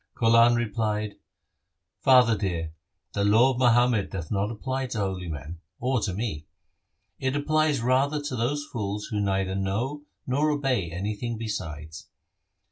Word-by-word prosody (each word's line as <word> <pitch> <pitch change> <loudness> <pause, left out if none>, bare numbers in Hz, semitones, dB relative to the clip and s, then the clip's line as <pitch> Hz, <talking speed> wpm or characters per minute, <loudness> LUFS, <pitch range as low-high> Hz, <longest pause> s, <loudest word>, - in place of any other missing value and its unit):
Kaulan 115 0 +5
replied, 105 -2 -1 0.8
'Father 125 -4 +6
dear, 85 -6 -2 0.4
the 100 - 0
law 110 +6 +5
of 125 - -5
Muhammad 120 -3 +3
doth 85 -5 -6
not 100 0 0
apply 130 +4 -3
to 120 - -5
holy 95 -3 -2
men 80 +1 -6 0.2
or 125 -1 0
to 100 - -1
me. 95 -6 -4 0.7
It 130 +1 -1
applies 155 -2 +1
rather 135 +5 +2
to 145 -3 -4
those 140 +5 -1
fools 105 -5 -4
who 105 - 0
neither 95 -1 0
know 105 +10 -2 0.2
nor 145 +4 +1
obey 135 - 0
anything 105 +7 -3
besides. 80 -8 -6
115 Hz, 140 wpm, -26 LUFS, 95-130 Hz, 0.8 s, Father